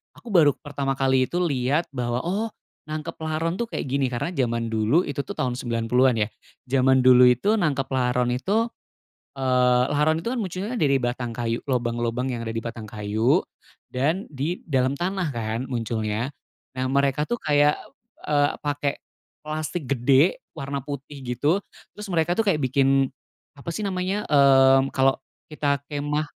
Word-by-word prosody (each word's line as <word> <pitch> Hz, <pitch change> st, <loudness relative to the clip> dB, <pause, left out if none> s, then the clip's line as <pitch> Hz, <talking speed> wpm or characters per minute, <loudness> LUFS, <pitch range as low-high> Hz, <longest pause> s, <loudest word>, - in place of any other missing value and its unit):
aku 235 Hz, -, -11 dB
baru 160 Hz, -6 st, +6 dB
pertama 140 Hz, -2 st, -3 dB
kali 130 Hz, -1 st, +2 dB
itu 175 Hz, -, -3 dB
lihat 145 Hz, 0 st, 0 dB
bahwa, 125 Hz, -2 st, -2 dB
oh, 200 Hz, +6 st, -1 dB, 0.4 s
nangkep 155 Hz, +2 st, -5 dB
laron 160 Hz, +3 st, -2 dB
tuh 235 Hz, -, -1 dB
kayak -, -, -4 dB
gini. 135 Hz, 0 st, 0 dB
Karena 125 Hz, +7 st, -3 dB
zaman 115 Hz, -7 st, -1 dB
dulu, 110 Hz, +10 st, +2 dB
itu 145 Hz, -3 st, -5 dB
tuh 140 Hz, -, -8 dB
tahun 125 Hz, -1 st, -1 dB
90-an 120 Hz, +2 st, +2 dB
ya, -, -, -2 dB, 0.4 s
zaman 130 Hz, 0 st, +3 dB
dulu 125 Hz, 0 st, +7 dB
itu, 165 Hz, -, +3 dB
nangkep 140 Hz, -7 st, 0 dB
laron 125 Hz, -1 st, +1 dB
itu, 210 Hz, -, 0 dB, 0.7 s
eee, 125 Hz, -1 st, +3 dB
laron 155 Hz, +2 st, +2 dB
itu 165 Hz, -, -4 dB
kan -, -, -3 dB
munculnya 195 Hz, +5 st, -4 dB
dari 140 Hz, -, +3 dB
batang 120 Hz, -1 st, -2 dB
kayu, 115 Hz, 0 st, -3 dB
lobang-lobang 120 Hz, +1 st, -1 dB
yang 115 Hz, -, -4 dB
ada 115 Hz, -, -4 dB
di 115 Hz, -, -3 dB
batang 115 Hz, -1 st, -7 dB
kayu 110 Hz, +3 st, +1 dB, 0.5 s
dan 155 Hz, +10 st, 0 dB
di 150 Hz, +5 st, -3 dB
dalam 135 Hz, -2 st, +1 dB
tanah 185 Hz, -2 st, -1 dB
kan 115 Hz, -3 st, -3 dB
munculnya. 115 Hz, +1 st, -2 dB, 0.4 s
Nah, 130 Hz, 0 st, -2 dB
mereka 140 Hz, +1 st, +2 dB
tuh 240 Hz, +8 st, -2 dB
kayak, 145 Hz, -3 st, +3 dB, 0.4 s
p -, -, -14 dB
eee, 145 Hz, -1 st, +3 dB
pake 145 Hz, -1 st, -1 dB, 0.5 s
plastik 155 Hz, +1 st, -4 dB
gede 135 Hz, +5 st, +3 dB
warna 140 Hz, 0 st, -4 dB
putih 140 Hz, +1 st, -7 dB
gitu, 130 Hz, +9 st, 0 dB, 0.3 s
terus 210 Hz, 0 st, -8 dB
mereka 175 Hz, 0 st, +1 dB
tuh 225 Hz, -, +2 dB
kayak 185 Hz, -6 st, +3 dB
bikin, 135 Hz, 0 st, +2 dB, 0.5 s
apa 140 Hz, +3 st, -7 dB
sih 210 Hz, +6 st, -3 dB
namanya, 190 Hz, +2 st, -2 dB
mmm, 135 Hz, -1 st, +5 dB
kalau 135 Hz, 0 st, +3 dB, 0.3 s
kita 145 Hz, -2 st, -1 dB
kemah, 145 Hz, +1 st, -2 dB
135 Hz, 160 wpm, -24 LUFS, 125-155 Hz, 0.7 s, dulu